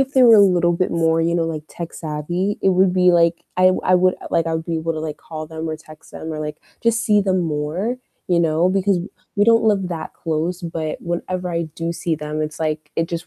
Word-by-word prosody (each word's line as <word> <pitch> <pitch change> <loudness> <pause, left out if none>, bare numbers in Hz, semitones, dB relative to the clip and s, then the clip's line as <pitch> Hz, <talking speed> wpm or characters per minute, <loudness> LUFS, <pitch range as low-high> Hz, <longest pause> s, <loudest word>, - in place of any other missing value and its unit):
if 270 +1 0
they 260 - +5
were 230 -2 +8
a 205 - +8
little 175 -3 +4
bit 180 +2 0
more, 165 -1 +2
you 170 +1 +1
know, 170 - +1
like 160 -2 -3
tech-savvy, 170 +3 -3
it 195 - +4
would 185 0 +3
be 180 -1 +4
like 170 0 +2
I 185 0 +6
I 185 - +4
would 185 0 +4 0.2
like 165 -1 +1
I 165 - -1
would 160 0 -3
be 170 - -2
able 165 +1 -2
to 155 - -4
like 155 -1 -5
call 155 -1 -7
them 160 +1 -5
or 155 - -3
text 155 0 -16
them 160 - -6
or, 155 - -4
like, 150 0 -4 0.3
just 230 0 +2
see 210 -2 +4
them 190 -2 +1
more, 160 +9 -2 0.3
you 175 -1 +3
know? 165 +2 +2
Because 195 0 +2 0.4
we 205 - +4
don't 230 0 +4
live 200 -4 +2
that 165 -3 -5
close, 165 +2 -2
but 160 -2 -4
whenever 180 +1 -3
I 170 0 -1
do 165 0 -3
see 170 -1 -2
them, 150 0 -4
it's 155 +1 -5
like 155 -1 -2
it 165 0 0
just 170 -1 -4
170 Hz, 245 wpm, -20 LUFS, 160-185 Hz, 0.4 s, were